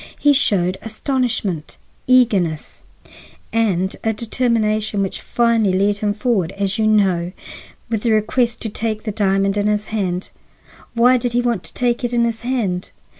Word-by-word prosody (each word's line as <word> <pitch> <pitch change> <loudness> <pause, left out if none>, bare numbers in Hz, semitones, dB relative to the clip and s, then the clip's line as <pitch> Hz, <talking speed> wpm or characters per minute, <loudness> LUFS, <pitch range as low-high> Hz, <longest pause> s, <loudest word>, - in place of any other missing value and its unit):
He 290 0 +4
showed 190 -9 +1
astonishment, 225 - -2 0.3
eagerness, 205 -12 +2 0.7
and 195 -5 +1
a 225 - +1
determination 215 -2 0
which 195 - -4
finally 230 -5 +2
led 200 +1 +1
him 210 0 0
forward, 210 -6 0
as 200 +1 -2
you 215 - +3
know, 185 -5 +2 0.5
with 225 -3 -2
the 235 - +1
request 230 +2 +1
to 225 - -1
take 215 0 -3
the 215 - -3
diamond 195 -1 +1
in 205 0 +1
his 210 0 0
hand. 185 -4 -2 0.6
Why 245 +2 +5
did 245 0 -2
he 245 - +2
want 235 -5 0
to - - -11
take 245 0 0
it 245 0 -2
in 235 -1 +3
his 230 -1 -3
hand? 225 -8 -2
215 Hz, 160 wpm, -19 LUFS, 195-235 Hz, 0.7 s, Why